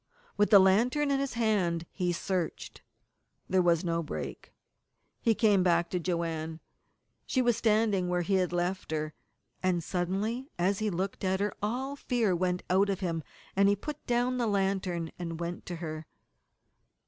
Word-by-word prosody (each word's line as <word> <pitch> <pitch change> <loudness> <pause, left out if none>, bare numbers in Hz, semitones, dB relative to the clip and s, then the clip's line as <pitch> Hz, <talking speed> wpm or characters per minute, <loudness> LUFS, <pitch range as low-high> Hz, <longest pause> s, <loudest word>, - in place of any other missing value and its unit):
With 205 - +3
the 205 - +9
lantern 235 +10 +4
in 275 - +2
his 275 -1 -2
hand 190 -8 +1
he 180 -2 -1
searched. 175 0 -3 0.7
There 185 0 +3
was 170 -1 +3
no 170 -1 0
break. 80 - -6 0.7
He 225 -1 +3
came 205 -4 +4
back 170 -1 +2
to 180 - 0
Joanne. 165 -2 -2 0.7
She 260 - 0
was 240 -2 +3
standing 210 -5 +2
where 180 0 +1
he 195 - -1
had 185 -2 +2
left 175 +2 -1
her. 155 -1 -2 0.5
And 180 -2 +1
suddenly, 200 - -2
as 190 +3 +1
he 215 0 0
looked 190 +2 -3
at 190 0 +1
her, 205 +1 0
all 255 +7 -2
fear 235 -9 +1
went 180 0 0
out 195 +2 +3
of 195 -1 -1
him, 165 -3 -1 0.3
and 200 +1 +5
he 200 - +4
put 300 +8 -7
down 245 +1 +1
the 235 - +1
lantern 190 -4 0
and 165 -2 -4
went 175 +1 -5
to 175 - -4
her. 155 -2 -6
190 Hz, 170 wpm, -30 LUFS, 175-215 Hz, 0.7 s, the